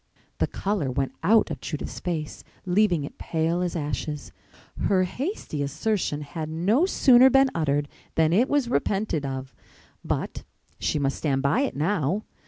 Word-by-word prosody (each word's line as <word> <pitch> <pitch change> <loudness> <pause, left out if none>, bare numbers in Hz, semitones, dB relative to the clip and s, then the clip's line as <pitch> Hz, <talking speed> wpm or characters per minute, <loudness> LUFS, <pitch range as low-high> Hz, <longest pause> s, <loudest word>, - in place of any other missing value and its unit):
The - - +2
color 195 -8 -2
went 135 +1 -1
out 215 +6 +4
of - - -5
Judith's 150 - -5
face, 160 -4 -4 0.2
leaving 180 -4 +2
it 140 - -9
pale 165 +2 0
as 180 -1 -2
ashes. 150 -1 -4 0.5
Her 185 -2 +3
hasty 250 - -4
assertion 150 - -1
had 155 +2 -5
no 200 - +2
sooner 260 -7 +6
been 270 0 +4
uttered 145 -3 0 0.3
than 160 0 +3
it 240 +8 +3
was 285 -4 +2
repented 195 - 0
of, 130 -1 -5 0.5
but - - -3 0.4
she - - 0
must 140 -1 0
stand 135 -3 0
by 140 - +2
it 280 - -1
now. 165 +4 0
165 Hz, 155 wpm, -25 LUFS, 145-215 Hz, 0.5 s, sooner